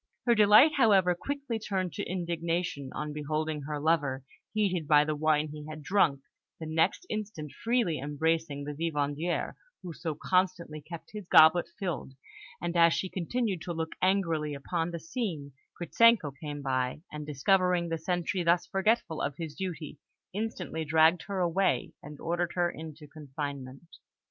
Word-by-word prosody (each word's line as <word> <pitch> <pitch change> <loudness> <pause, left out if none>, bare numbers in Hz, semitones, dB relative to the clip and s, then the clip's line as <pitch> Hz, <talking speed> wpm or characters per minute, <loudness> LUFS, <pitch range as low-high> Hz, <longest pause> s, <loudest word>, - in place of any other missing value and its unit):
Her 240 - +5
delight, 215 +7 +7
however, 195 -8 +5
quickly 275 +4 -4
turned 190 -6 -2
to - - -3
indignation 170 -4 -2
on 150 0 -4
beholding 155 +1 -2
her 150 -1 -3
lover, 145 -4 +1 0.3
heated 185 -7 0
by 150 0 +6
the 155 0 -1
wine 155 0 +1
he 150 0 -8
had 155 -1 -8
drunk, 150 -6 +2 0.4
the 160 - -6
next 160 - +1
instant 205 - -5
freely 230 -9 0
embracing 150 +1 -1
the 145 +1 -5
vivandière 150 +1 -1 0.3
who 175 -2 -6
so 160 -1 -4
constantly 180 -4 0
kept 170 +2 -10
his 210 -4 -8
goblet 160 +2 +7
filled; 175 -9 -4 0.5
and 175 0 -3
as 170 -1 +5
she 190 - -2
continued 195 +1 -2
to 175 - -4
look 160 0 -3
angrily 165 -6 +1
upon 165 +4 -2
the 170 -1 -5
scene, 165 - -4 0.3
Gritzenko 215 -2 +4
came 145 -2 -5
by, 130 +2 -1
and, 150 0 -6
discovering 180 +4 +2
the 165 -1 -2
sentry 180 +2 -1
thus 170 +1 +3
forgetful 195 -4 0
of 140 -1 -2
his 160 -3 -5
duty, 165 -5 -6 0.3
instantly 190 -6 -3
dragged 160 +2 +4
her 195 -2 -2
away, 175 -6 +1
and 150 0 -10
ordered 175 +1 -1
her 175 -1 +1
into 155 -1 -9
confinement. 140 0 -7
165 Hz, 155 wpm, -29 LUFS, 150-185 Hz, 0.5 s, delight